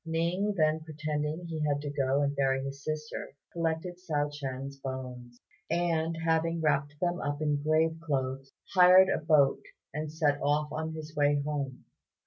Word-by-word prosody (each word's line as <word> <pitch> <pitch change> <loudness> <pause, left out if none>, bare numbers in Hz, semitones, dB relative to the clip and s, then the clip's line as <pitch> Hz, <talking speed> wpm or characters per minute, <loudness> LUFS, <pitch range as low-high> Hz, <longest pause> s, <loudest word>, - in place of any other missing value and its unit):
Ning 170 +5 0
then 155 -1 +3
pretending 155 +1 -3
he 165 -2 -4
had 145 -1 +1
to 145 -1 -4
go 140 0 +1
and 140 0 0
bury 135 -1 +1
his 135 0 -6
sister, 155 -1 -5 0.2
collected 170 +1 -2
Hsiao 150 -5 -1
ch'ien's 135 -1 -5
bones, 125 -2 -7 0.3
and, 165 -1 0
having 165 +1 +1
wrapped 150 -2 0
them 175 0 0
up 145 0 -2
in 150 -2 0
grave 160 +2 +2
clothes, 135 -3 -2 0.2
hired 185 0 +8
a - - +1
boat, 150 -3 +4 0.3
and 150 +1 -3
set 150 -3 +1
off 150 +1 +1
on 160 +1 -3
his 155 0 -8
way 145 0 +3
home. 140 -4 -3
150 Hz, 160 wpm, -30 LUFS, 140-160 Hz, 0.3 s, hired